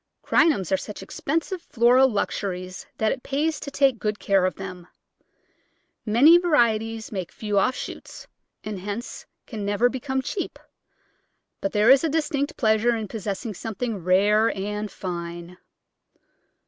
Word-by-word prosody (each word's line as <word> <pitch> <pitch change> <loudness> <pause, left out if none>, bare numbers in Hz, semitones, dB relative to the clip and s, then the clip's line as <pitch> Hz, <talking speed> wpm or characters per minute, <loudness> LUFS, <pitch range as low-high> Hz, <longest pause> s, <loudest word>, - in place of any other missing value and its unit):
Crinums 200 - +2
are 190 - +4
such 210 - -8
expensive 330 +5 -3
floral 250 0 +4
luxuries 185 -4 -3
that 220 0 +1
it 255 - -3
pays 300 +4 -1
to 280 - -6
take 275 -4 +2
good 210 0 -1
care 195 -2 +2
of 185 - -4
them. 185 -2 -8 1.2
Many 285 +11 +7
varieties 225 -9 +1
make 190 -5 -4
few 210 -2 -1
offshoots, 255 +6 -3 0.4
and 210 -2 -5
hence 205 +5 -6 0.2
can 220 -4 -6
never 205 +4 +2
become 265 +1 -3
cheap, 375 - -4 1.0
but 295 - -2
there 210 +3 +5
is 270 +2 +6
a 325 - +1
distinct 300 -1 -1
pleasure 220 +1 +3
in 220 -2 -4
possessing 215 +1 -4
something 220 -1 -4
rare 205 +5 +4
and 210 +2 -3
fine. 175 -1 -6
220 Hz, 135 wpm, -24 LUFS, 200-265 Hz, 1.2 s, Many